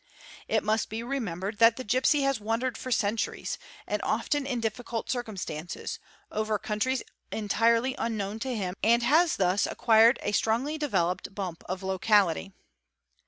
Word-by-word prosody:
must 215 +1 0
be 225 +2 -4
remembered 210 -6 -3
that 230 0 +7
the 255 - -4
gipsy 255 +6 +2
has: 275 -3 +1
wandered 225 +3 -1
for 255 - -6
centuries, 225 -1 -1 0.4
often 290 -2 0
in 250 -3 -1
difficult 230 +1 -3
circumstances, 190 -9 -4 0.3
over 215 0 0
countries 220 +6 -1 0.3
entirely 230 +4 +2
unknown 215 -2 -2
to 265 - -3
h 200 -7 -2
and 235 +3 +4
has 315 +7 +4
thus 190 +1 +2
acquired 230 +2 +5
a - - 0
strongly 230 +8 +1
developed 195 - -1
bump 185 -5 -5
of 185 +1 -3
locality. 190 -1 +2
225 Hz, 135 wpm, -28 LUFS, 200-245 Hz, 0.4 s, that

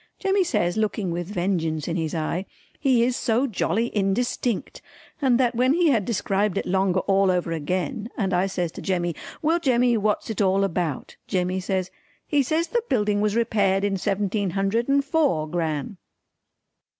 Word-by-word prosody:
Jemmy 390 0 +2
says 175 - 0
looking 210 -3 -1
with 170 0 -3
vengeance 175 -5 -1
in 170 - -2
his 160 -1 -2
eye 165 +4 -2 0.3
"He 260 -5 +3
is 245 +1 +1
so 235 +3 +1
jolly 230 0 -1
indistinct!" 210 +3 -1 0.4
and 260 -3 +3
that 245 -2 +2
when 250 +3 +3
he 340 0 +3
had 220 -7 +1
described 205 -3 0
it - - -1
longer 190 0 +1
all 195 0 +2
over 180 -2 0
again 180 +7 -2
and 195 -5 0
I 180 +2 +2
says 180 -3 -2
to - - -9
Jemmy 175 -2 -1 0.3
"Well 325 +3 +2
Jemmy 245 -5 +3
what's 210 +1 0
it 215 - -2
all 195 0 +3
about?" 170 -6 -2
Jemmy 185 -1 0
says 185 -1 -2 0.3
"He 290 -2 +2
says 315 +5 0
the 475 - +1
building 210 -4 +1
was 210 0 +1
repaired 200 -4 +2
in 200 -1 +1
seventeen 200 +1 -1
hundred 215 +6 0
and 280 0 +3
four, 280 - +1
Gran." 160 +1 -3
200 Hz, 175 wpm, -24 LUFS, 180-240 Hz, 0.4 s, He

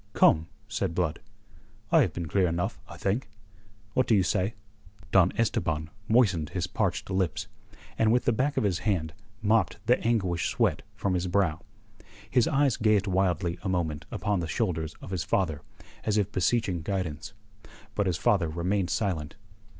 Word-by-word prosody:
"Come," 80 +1 +4 0.2
said 100 -6 -2
Blood. 85 -3 0 0.7
"I - - +6
have - - +2
been 85 - -4
clear 95 +3 +2
enough, 85 +1 -2
I - - -9
think. 105 +6 -1 0.6
What 130 - +2
do 110 - +4
you 95 - +4
say?" 95 +5 0 0.6
Don 95 -2 +5
Esteban 80 -8 0 0.2
moistened 100 -10 +3
his 90 -3 -2
parched 95 -1 -2
lips, 95 -2 0 0.5
and 110 -1 +4
with 125 +1 +2
the 120 - +3
back 135 +6 0
of - - +2
his 95 -4 +1
hand 85 -7 -1 0.3
mopped 110 -2 +2
the 125 +3 +4
anguish 95 -7 +1
sweat - - +1
from 100 - -1
his 90 0 0
brow. 90 -4 +1 0.7
His 125 -3 +3
eyes 140 -3 +2
gazed 105 -2 +3
wildly 90 -3 0
a 95 - -3
moment 80 -5 -1
upon 105 -3 -1
the 85 - -2
shoulders 80 -7 -1
of - - -8
his 90 -4 -1
father, 80 -2 0 0.4
as 110 -1 +1
if 100 -1 +1
beseeching 95 -2 +1
guidance. 85 -4 -3 0.6
But 100 -2 0
his 90 -4 0
father 85 +1 +2
remained 90 +3 -1
silent. 85 -8 -1
95 Hz, 165 wpm, -28 LUFS, 85-105 Hz, 0.7 s, I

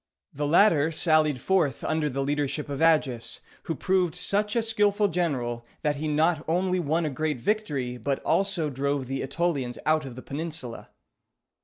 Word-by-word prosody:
The 145 +1 -2
latter 160 -2 +4
sallied 155 -4 +2
forth 165 -5 +1
under 155 -1 0
the 135 0 -2
leadership 145 +1 -1
of 140 0 -4
Agis, 140 -8 +2 0.3
who 165 - -2
proved 185 +1 +1
such 205 +4 -1
a 230 - +2
skillful 210 -2 +2
general, 125 -10 -1 0.2
that 150 -1 +1
he 155 +2 -3
not 155 +1 +2
only 180 +2 +1
won 165 +1 0
a 150 - -1
great 150 -1 -2
victory, 140 - -1
but 135 +4 -1
also 190 -6 +1
drove 140 0 -1
the 135 +1 -3
Ætolians 135 -4 -1
out 155 0 +3
of 130 -3 -8
the 130 - -9
peninsula. 150 -5 -5
155 Hz, 165 wpm, -26 LUFS, 135-175 Hz, 0.3 s, latter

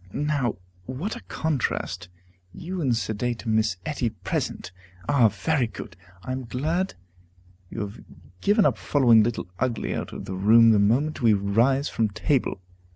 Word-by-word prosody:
Now, 145 -5 0 0.3
what 145 - -4
a - - -9
contrast 110 - -2 0.5
you 180 +1 -5
and 125 -6 +1
sedate 115 +2 -3
Miss 110 -3 +1
Etty 140 -6 -1
present! 95 -2 -4 0.4
Ah, 125 -5 +5
very 120 +6 0
good! 110 - -9 0.3
I - - -5
am 130 0 -4
glad 160 +11 -1 0.7
you - - -5
have 100 0 -6 0.4
given 205 +1 +3
up 115 -8 +2
following 115 +3 +5
Little 115 +2 -1
Ugly 125 -3 -1
out - - -4
of - - -7
the 95 - -5
room 115 +4 +6
the 105 - +4
moment 130 +10 +1
we 115 -3 +5
rise 115 +8 +2
from 110 -2 0
table. 105 - -1
120 Hz, 155 wpm, -25 LUFS, 110-145 Hz, 0.7 s, room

